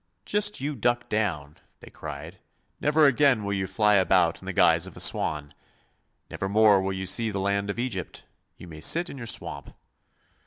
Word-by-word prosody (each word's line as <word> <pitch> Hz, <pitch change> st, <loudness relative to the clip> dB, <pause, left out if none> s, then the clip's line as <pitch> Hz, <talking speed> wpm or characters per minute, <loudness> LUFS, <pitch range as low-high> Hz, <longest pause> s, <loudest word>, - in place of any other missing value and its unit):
'Just 210 Hz, 0 st, 0 dB
you 145 Hz, +2 st, -3 dB
duck 120 Hz, +1 st, -1 dB
down,' 85 Hz, -9 st, -2 dB, 0.2 s
they -, -, -14 dB
cried. 75 Hz, -2 st, -9 dB, 0.4 s
'Never 150 Hz, +1 st, +3 dB
again 140 Hz, -4 st, +3 dB
will 100 Hz, 0 st, -2 dB
you 95 Hz, -1 st, -2 dB
fly 105 Hz, +2 st, +2 dB
about 95 Hz, -, +2 dB
in -, -, -12 dB
the -, -, -2 dB
guise -, -, +3 dB
of -, -, -12 dB
a -, -, -8 dB
swan; 75 Hz, -1 st, 0 dB, 0.7 s
never 95 Hz, -, -5 dB
more 105 Hz, -1 st, +5 dB
will 95 Hz, 0 st, -2 dB
you 95 Hz, 0 st, -4 dB
see 110 Hz, +4 st, +1 dB
the 100 Hz, -, -4 dB
land 100 Hz, +1 st, -1 dB
of 100 Hz, -, -3 dB
Egypt; 120 Hz, -7 st, -4 dB, 0.3 s
you -, -, -12 dB
may 80 Hz, -2 st, -11 dB
sit 170 Hz, -, +2 dB
in 140 Hz, -, -9 dB
your 115 Hz, -, -7 dB
swamp.' -, -, -5 dB
100 Hz, 190 wpm, -26 LUFS, 95-120 Hz, 0.7 s, more